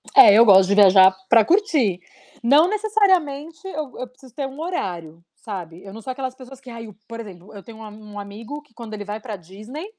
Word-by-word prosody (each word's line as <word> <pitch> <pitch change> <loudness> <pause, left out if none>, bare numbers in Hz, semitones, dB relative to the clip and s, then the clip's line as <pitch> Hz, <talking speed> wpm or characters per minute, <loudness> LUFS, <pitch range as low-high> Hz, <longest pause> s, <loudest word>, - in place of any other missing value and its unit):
É, 400 - +9
eu 230 +3 +7
gosto 190 -2 +6
de 200 - +2
viajar 190 -2 +6
pra 225 -2 +5
curtir. 310 - +1 0.4
Não 290 +8 +5
necessariamente 380 -6 0
eu 305 -7 -6
eu 255 - -5
preciso 255 0 -20
ter 275 +1 -4
um 270 +3 -12
horário, 170 - -5
sabe, 180 -7 -9
eu 195 0 -11
não 225 - -10
sou 260 - -6
aquelas 260 0 -6
pessoas 260 0 -13
que: 260 - -13
"Ai" 230 -1 -9
o 210 - -14
por 230 0 -9
exemplo, 195 -4 -12
eu 200 - -11
tenho 225 -1 -13
um - - -10
a 215 - -9
um 210 -1 -11
amigo 220 +8 -9
que 295 -6 -31
quando 225 -2 -10
ele 205 -1 -7
vai 210 +1 -6
pra 220 -2 -7
Disney, 215 - -10
230 Hz, 230 wpm, -21 LUFS, 200-285 Hz, 0.4 s, É